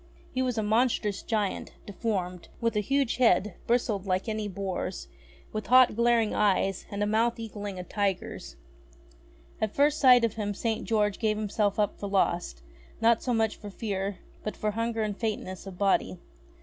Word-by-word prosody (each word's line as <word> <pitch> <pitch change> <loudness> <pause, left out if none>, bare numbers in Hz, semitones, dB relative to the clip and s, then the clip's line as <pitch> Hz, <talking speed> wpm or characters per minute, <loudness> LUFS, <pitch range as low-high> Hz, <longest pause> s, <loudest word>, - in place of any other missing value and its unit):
He 260 - 0
was 250 -2 -1
a 220 - +1
monstrous 215 -2 +1
giant, 210 -4 -2
deformed, 190 -4 -3
with 230 -1 0
a - - +3
huge 275 +3 +1
head, 210 -5 +3
bristled 225 -5 +1
like 185 +2 0
any 215 -1 -2
boar's, 190 -1 -4 0.5
with 215 0 -4
hot, 255 -2 +6
glaring 235 -1 +3
eyes 195 -2 +1
and 205 0 -2
a - - +2
mouth 225 +3 +1
equalling 205 -3 -6
a 180 - -5
tiger's. 185 - -3 1.1
At 215 -1 -1
first 295 +2 +3
sight 250 -3 +7
of 225 - -2
him 205 -2 -3
St. 225 +1 -2
George 210 -3 +1
gave 215 -2 +1
himself 205 -1 0
up 210 -2 0
for 200 - -4
lost, 175 - 0 0.4
not 230 0 +4
so 250 - -2
much 225 -2 +1
for 205 - -8
fear, 195 -2 -3 0.3
but 215 - -4
for 215 - -1
hunger 230 +1 -1
and 210 -1 -2
faintness 200 -4 -4
of 185 -2 -8
body. 195 -2 +1
210 Hz, 175 wpm, -28 LUFS, 200-230 Hz, 1.1 s, sight